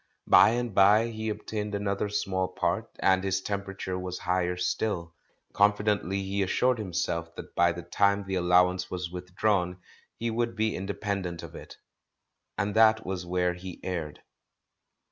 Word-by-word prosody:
By -, -, +7 dB
and 120 Hz, -2 st, -2 dB
by 105 Hz, +4 st, +5 dB
he 110 Hz, -1 st, -4 dB
obtained 105 Hz, -1 st, -4 dB
another 100 Hz, 0 st, -1 dB
small 95 Hz, -2 st, -1 dB
part, -, -, -2 dB
and 95 Hz, 0 st, +3 dB
his 95 Hz, 0 st, 0 dB
temperature 95 Hz, -2 st, -4 dB
was 90 Hz, 0 st, -4 dB
higher 90 Hz, 0 st, -1 dB
still. 90 Hz, -2 st, -2 dB, 0.4 s
Confidently 100 Hz, -2 st, +2 dB
he 100 Hz, +1 st, -2 dB
assured 125 Hz, +6 st, +2 dB
himself 85 Hz, -4 st, -3 dB
that -, -, -9 dB
by 85 Hz, 0 st, +4 dB
the 85 Hz, +1 st, -7 dB
time 100 Hz, +3 st, +1 dB
the 95 Hz, -, -4 dB
allowance 90 Hz, 0 st, +3 dB
was 90 Hz, -1 st, -4 dB
withdrawn 90 Hz, 0 st, -1 dB, 0.4 s
he 115 Hz, 0 st, -2 dB
would 115 Hz, +1 st, -1 dB
be 110 Hz, 0 st, 0 dB
inde 95 Hz, +2 st, -5 dB
pendent 95 Hz, -5 st, -3 dB
of -, -, -9 dB
it. -, -, -11 dB, 0.8 s
And 100 Hz, 0 st, -1 dB
that 110 Hz, 0 st, +5 dB
was 90 Hz, -2 st, -4 dB
where 90 Hz, 0 st, +1 dB
he 90 Hz, 0 st, -9 dB
erred. 85 Hz, -5 st, -4 dB
95 Hz, 155 wpm, -28 LUFS, 90-105 Hz, 0.8 s, By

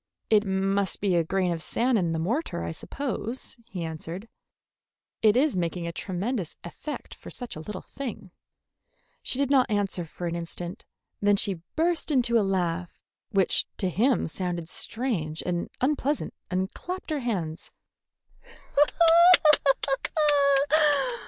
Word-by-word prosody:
"It 210 Hz, -1 st, +5 dB
must 195 Hz, 0 st, 0 dB
be 200 Hz, -2 st, +1 dB
a 170 Hz, -1 st, +3 dB
grain 185 Hz, +2 st, 0 dB
of 165 Hz, -1 st, -3 dB
sand 240 Hz, +8 st, +1 dB
in 170 Hz, -3 st, 0 dB
the 165 Hz, -, -1 dB
mortar, 185 Hz, -, -1 dB
I -, -, -3 dB
suppose," 255 Hz, -, -4 dB
he 185 Hz, -6 st, -5 dB
answered. 165 Hz, +5 st, -6 dB, 0.9 s
"It 215 Hz, +1 st, +5 dB
is 285 Hz, -1 st, +3 dB
making 175 Hz, -1 st, -2 dB
a 170 Hz, -, -3 dB
tremendous 190 Hz, +2 st, -3 dB
effect 295 Hz, -, -7 dB
for -, -, -12 dB
such 245 Hz, -2 st, -6 dB
a -, -, -7 dB
little 185 Hz, +4 st, -7 dB
thing." 235 Hz, -9 st, -7 dB, 0.9 s
She -, -, -2 dB
did 280 Hz, 0 st, +1 dB
not 260 Hz, -3 st, +4 dB
answer 200 Hz, -4 st, 0 dB
for 175 Hz, -, -7 dB
an 170 Hz, 0 st, -2 dB
instant. 170 Hz, +1 st, -6 dB, 0.4 s
Then 205 Hz, 0 st, +4 dB
she 195 Hz, -4 st, 0 dB
burst 335 Hz, +1 st, +1 dB
into 240 Hz, -5 st, +3 dB
a -, -, +3 dB
laugh 180 Hz, -3 st, -1 dB, 0.3 s
which 195 Hz, -3 st, +2 dB
to 190 Hz, -, 0 dB
him 240 Hz, +9 st, +2 dB
sounded 175 Hz, 0 st, -3 dB
strange 185 Hz, -13 st, -2 dB
and 175 Hz, -1 st, -2 dB
unpleasant, 290 Hz, +2 st, 0 dB, 0.2 s
and 185 Hz, +1 st, -1 dB
clapped 365 Hz, -2 st, -6 dB
her 300 Hz, -, 0 dB
hands. 185 Hz, -8 st, -3 dB
195 Hz, 140 wpm, -27 LUFS, 175-245 Hz, 0.9 s, It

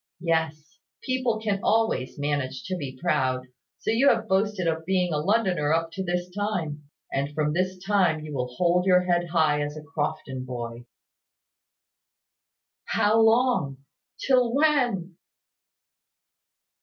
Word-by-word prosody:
Yes; 160 Hz, -2 st, -1 dB, 0.2 s
people 255 Hz, -4 st, 0 dB
can 210 Hz, -3 st, -1 dB
always 220 Hz, -, +1 dB
manage 140 Hz, -3 st, -2 dB
to 185 Hz, -, -3 dB
be 135 Hz, -6 st, -6 dB
proud: 130 Hz, -7 st, 0 dB, 0.3 s
so -, -, -2 dB
you 255 Hz, +5 st, +4 dB
have 230 Hz, -, +1 dB
boasted 190 Hz, -1 st, +1 dB
of 160 Hz, 0 st, -1 dB
being 180 Hz, -1 st, 0 dB
a 150 Hz, -, 0 dB
Londoner 185 Hz, -5 st, +1 dB
up 165 Hz, 0 st, 0 dB
to 190 Hz, +2 st, -4 dB
this 175 Hz, 0 st, -2 dB
time; 175 Hz, -8 st, -3 dB, 0.2 s
and 140 Hz, +2 st, -2 dB
from 150 Hz, -1 st, 0 dB
this 185 Hz, +2 st, -1 dB
time 185 Hz, -5 st, +1 dB
you 150 Hz, -1 st, -7 dB
will 125 Hz, -2 st, -2 dB
hold 180 Hz, +4 st, +2 dB
your 180 Hz, -1 st, +6 dB
head 175 Hz, -1 st, +1 dB
high 155 Hz, -3 st, +2 dB
as 145 Hz, +1 st, -4 dB
a 155 Hz, -, -8 dB
Crofton 145 Hz, -3 st, -4 dB
boy." 120 Hz, -1 st, -6 dB, 2.0 s
"How 215 Hz, +2 st, +2 dB
long? 220 Hz, -, +2 dB, 0.3 s
Till 250 Hz, -3 st, +3 dB
when?" 245 Hz, -, +1 dB
175 Hz, 135 wpm, -26 LUFS, 150-205 Hz, 2.0 s, your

